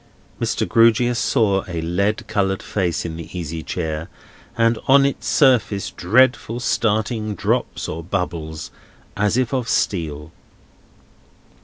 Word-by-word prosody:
Mr. - - 0
Grewgious 115 +1 +4
saw 100 -6 +2
a 85 -2 -4
lead 100 +6 -1
coloured 95 -1 0
face 90 -6 -1
in 80 -1 -5
the 85 - -8
easy 80 -1 -4
chair, 80 -1 -4 0.5
and 115 0 +2
on 135 +1 +6
its 140 - -2
surface 110 -8 +3
dreadful 120 +3 +2
starting 110 -2 0
drops - - -1
or 85 - -5
bubbles, 85 -3 -4 0.4
as 105 +3 +1
if 130 0 0
of 125 -3 -1
steel. 80 -4 -1
100 Hz, 125 wpm, -21 LUFS, 85-115 Hz, 0.5 s, on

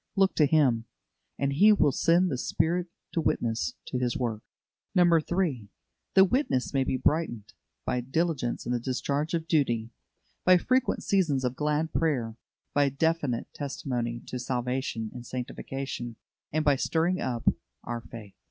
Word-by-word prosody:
Look 195 -1 +3
to 150 - +5
Him, 135 -7 +3 0.5
and 140 0 0
He 205 +9 +6
will 160 -9 +4
send 170 +6 +3
the 130 - -1
Spirit 170 +5 0 0.2
to 165 - 0
witness 115 -6 0
to 125 - -1
His 125 +2 0
work. 115 -5 -2 0.6
3. 170 - +2 0.5
The 190 0 +8
witness 190 - 0
may 135 -1 +3
be 130 - -1
brightened 130 -7 0 0.3
by 125 - 0
diligence 135 -1 -1
in 120 - -2
the 125 - +1
discharge 140 +5 -1
of 165 -1 -3
duty, 120 -8 +1 0.5
by 185 0 +7
frequent 255 +7 +1
seasons 155 -10 +2
of 125 0 -1
glad 150 +2 0
prayer, 125 -9 0 0.4
by 145 -1 +3
definite 140 -3 -1
testimony 120 -4 -3
to 125 - -5
salvation 125 -2 -2
and 125 - -8
sanctification, 125 -1 -5 0.4
and 155 0 0
by 145 -2 +4
stirring 170 +6 +1
up 120 -3 -3 0.4
our 120 0 -4
faith. 110 -4 -11
140 Hz, 150 wpm, -28 LUFS, 120-165 Hz, 0.6 s, The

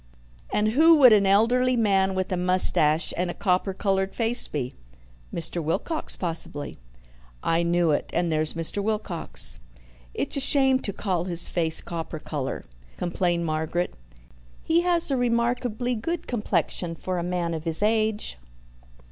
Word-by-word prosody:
And 210 +1 +1
who 320 +8 +6
would 260 -6 +7
an 200 -2 +4
elderly 245 +6 +3
man 195 -3 +2
with 185 0 -2
a - - +1
moustache 180 -3 +2
and 180 +1 -1
a - - -5
copper 195 -1 0
coloured 195 0 -1
face 235 +1 +2
be?" 130 -4 -4 0.6
"Mr. 170 0 -4
Wilcox, 310 - -1
possibly." 160 - -4 0.6
"I 165 +1 +1
knew 170 -1 +2
it. 145 - -1
And 170 0 0
there's 155 0 0
Mr. 165 +5 +1
Wilcox." 200 - -2 0.6
"It's - - -1
a - - 0
shame 265 -1 +4
to 205 - -3
call 185 -4 -2
his 175 -2 0
face 160 -2 +1
copper 165 -1 -6
colour," 145 -3 -5 0.3
complained 175 -1 -1
Margaret. 160 +2 -2 0.7
"He 330 +1 +2
has 345 -3 +1
a 270 - +1
remarkably 245 0 0
good 330 +10 -3
complexion 180 -6 -2
for 180 +2 -4
a - - -3
man 175 -1 -2
of 160 0 -5
his 165 +4 +4
age." 215 - 0
185 Hz, 150 wpm, -25 LUFS, 170-230 Hz, 0.7 s, would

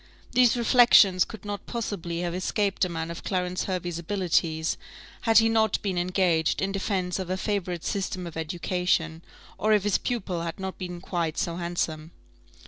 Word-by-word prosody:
These 250 -1 +4
reflections 235 -6 +6
could 220 - -11
not 205 -1 -5
possibly 180 -7 -3
have 175 -1 -2
escaped 195 +2 0
a 185 - +2
man 165 -1 -4
of 170 - -8
Clarence 180 -1 -1
Hervey's 175 -3 -3
abilities, 170 -3 0 0.5
had 225 - +6
he 225 0 +7
not 220 -1 +2
been 190 -3 0
engaged 175 -3 +1
in 195 +1 0
defence 195 -2 -1
of 185 -2 -4
a 185 - -1
favourite 185 -4 -2
system 185 -2 -2
of 170 - -8
education, 165 0 -1 0.4
or 215 +1 +3
if 210 -2 +3
his 205 -1 +2
pupil 190 -8 -2
had 170 +3 -5
not 190 0 -5
been 180 -2 -6
quite 170 -4 -2
so 170 -4 -1
handsome. 170 -3 -3
185 Hz, 170 wpm, -26 LUFS, 170-200 Hz, 0.5 s, he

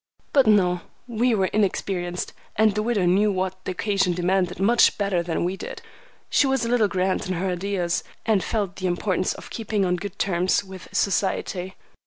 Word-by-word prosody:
But 275 -5 +5
no; 180 -4 +4 0.3
we 240 0 +1
were 190 -2 +2
inexperienced, 185 -3 -1 0.2
and 215 -1 +4
the 210 - 0
widow 215 -4 +1
knew 200 +4 +3
what 185 0 -3
the - - -2
occasion 195 -1 +1
demanded 180 +1 0
much 235 +5 +4
better 200 -4 +1
than 170 -1 -2
we 180 +2 -1
did. - - -7 0.5
She 285 - +3
was 265 -3 +1
a - - -2
little 235 -3 +3
grand 190 +1 -1
in 185 - -1
her 185 +2 -1
ideas, 180 -1 -1 0.2
and 215 -4 +2
felt 200 -4 -2
the 185 - -2
importance 185 +1 0
of - - -11
keeping 215 -3 -1
on 180 0 +1
good 195 +1 -7
terms 180 0 +1
with 190 -1 -11
society. 190 -1 -1
190 Hz, 185 wpm, -24 LUFS, 180-210 Hz, 0.5 s, But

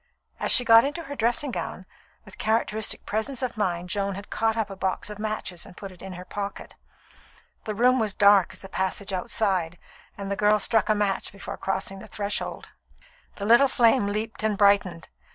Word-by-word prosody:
As - - +1
she 245 - +6
got 230 -1 +8
into 295 +5 -3
her 285 -2 -7
dressing 240 +3 0
gown, - - -5 0.4
with - - -14
characteristic 220 -1 -1
presence 235 +5 -2
of 250 - -2
mind 180 -4 -2
Joan 200 -1 -1
had 200 +2 -9
caught 225 0 0
up 215 -3 -1
a - - -6
box 190 +2 -2
of 210 - -8
matches 215 -5 -3
and - - -14
put 195 -1 -8
it 180 - -16
into 190 -2 -8
her 180 - -9
pocket. 200 +1 -6 0.9
The 215 - -3
room 250 +3 +4
was 220 -2 +1
as - - -30
dark 200 -2 +6
as - - -10
the - - -8
passage 190 +1 -3
outside, 185 -4 0 0.4
and 200 -1 -5
the - - 0
girl 210 +1 +4
struck 220 +1 +1
a 215 - +4
match 205 -2 -1
before 195 - -7
crossing 195 0 -3
the 215 - -11
threshold. 205 -1 -4 0.7
The 200 - -5
little 235 +6 +6
flame 235 -3 +3
leaped 215 +2 -3
and 215 -1 0
brightened. 200 -5 +3
205 Hz, 200 wpm, -25 LUFS, 195-225 Hz, 0.9 s, got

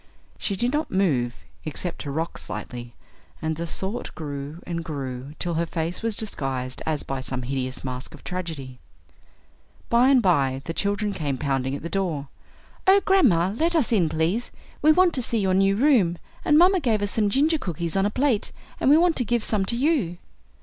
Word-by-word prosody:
She 200 - 0
did 240 +6 0
not 300 +1 0
move, 135 -11 +1 0.3
except 165 +3 -3
to 145 - -5
rock 160 +4 -3
slightly, 120 -1 -7 0.4
and 160 0 -2
the 170 +2 -4
Thought 195 +7 -5
grew 145 0 -6
and 170 -1 -3
grew 140 -2 -5
till 175 - -2
her 165 +1 0
face 165 +1 -3
was 225 -2 -1
disguised 135 - -3
as 155 -2 0
by 135 -1 -4
some 130 -1 -4
hideous 130 0 -3
mask 130 0 -5
of - - -16
tragedy. 160 -8 -5 1.1
By 240 +2 +5
and 270 -2 +6
by 140 - +2
the 165 - -3
children 205 +2 0
came 145 -7 -2
pounding 135 -1 -1
at 145 - -7
the - - -3
door. 170 -7 -2 0.6
"Oh, 390 +1 +7
grandma, 200 - +4
let 335 +7 +1
us 300 -8 +2
in, 185 -8 +3
please. 165 +10 0 0.3
We 310 - +6
want 360 +1 +4
to 260 - 0
see 230 -1 +1
your 190 -3 +1
new 195 +1 +3
room, 220 - +3 0.3
and 300 - +4
mamma 365 +3 +6
gave 225 -8 +1
us 205 - 0
some 210 -2 +2
ginger 300 +8 +3
cookies 170 - -3
on 195 +1 +3
a - - 0
plate, 255 -1 +1 0.3
and - - +3
we 295 - +8
want 340 -1 +4
to 245 - +2
give 240 -1 0
some 205 -3 0
to 235 - 0
you." 250 - +1
180 Hz, 195 wpm, -24 LUFS, 145-235 Hz, 1.1 s, we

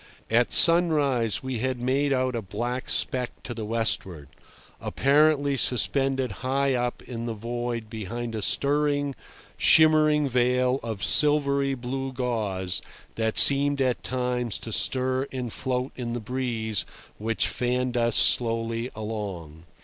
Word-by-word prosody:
At 120 +1 +2
sunrise 150 - +4
we 130 -3 -4
had 130 +1 -2
made 135 +4 0
out 130 -1 0
a 115 - -2
black 120 +6 -5
speck 125 -1 0
to 120 - -6
the 110 -2 -6
westward, 95 - -2 0.5
apparently 145 0 +2
suspended 135 +1 +1
high 135 +1 0
up 125 -1 -3
in 120 -1 -6
the 115 - -4
void 120 +1 -5
behind 115 +2 -6
a 110 - -4
stirring, 145 +3 0 0.4
shimmering 155 -2 +4
veil 125 +1 +1
of 110 -4 -5
silvery 140 -2 +2
blue 135 +2 -5
gauze 105 -8 -2 0.3
that 110 -1 -2
seemed 140 0 +6
at 130 -2 0
times 125 -2 -2
to 115 - -7
stir 130 +4 +1
and 125 -4 -5
float 130 0 -3
in 120 -2 -5
the 120 - -3
breeze 115 -3 -3 0.4
which 115 +2 -1
fanned 125 0 -2
us 115 -2 +1
slowly 115 0 +1
along. 100 -8 -7
125 Hz, 135 wpm, -25 LUFS, 115-135 Hz, 0.5 s, seemed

